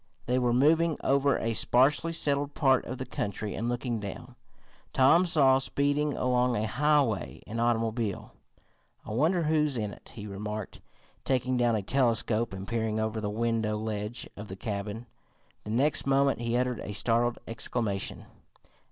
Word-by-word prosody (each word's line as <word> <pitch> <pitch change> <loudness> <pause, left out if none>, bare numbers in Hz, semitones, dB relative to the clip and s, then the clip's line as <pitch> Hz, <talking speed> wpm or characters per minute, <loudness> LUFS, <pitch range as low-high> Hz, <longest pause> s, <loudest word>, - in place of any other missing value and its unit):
They 125 +1 +1
were 125 -1 +1
moving 155 +6 +3
over 140 0 +3
a 115 0 -1
sparsely 135 +9 +3
settled 145 -3 0
part 135 -3 +3
of 130 - -5
the 130 - -5
country, 105 -1 -4
and 115 +2 -2
looking 120 -1 -2
down, 100 -2 -8 0.6
Tom 165 +8 +5
saw, 135 -5 +5
speeding 145 +2 0
along 125 -1 +1
a 110 - 0
highway, 140 -3 +1
an 115 +2 -5
automobile. 115 -2 -1 0.7
"I - - -7
wonder 160 - +2
who's 150 -3 +1
in 105 -3 -3
it?" - - -15
he 105 -2 -7
remarked, 105 +1 -6 0.4
taking 130 -1 0
down 120 -2 +2
a 105 - -2
telescope 115 -2 +1
and 95 0 -7
peering 110 -2 -1
over 110 0 -2
the 105 - -2
window 110 0 0
ledge 105 +1 -4
of 105 +1 -8
the 95 - -7
cabin. 105 +3 -5 0.6
The - - -7
next 135 +6 +1
moment 135 -2 +2
he 120 0 0
uttered 125 -1 0
a 105 - -6
startled 120 +3 +1
exclamation. 115 -3 -2
120 Hz, 160 wpm, -28 LUFS, 110-135 Hz, 0.7 s, Tom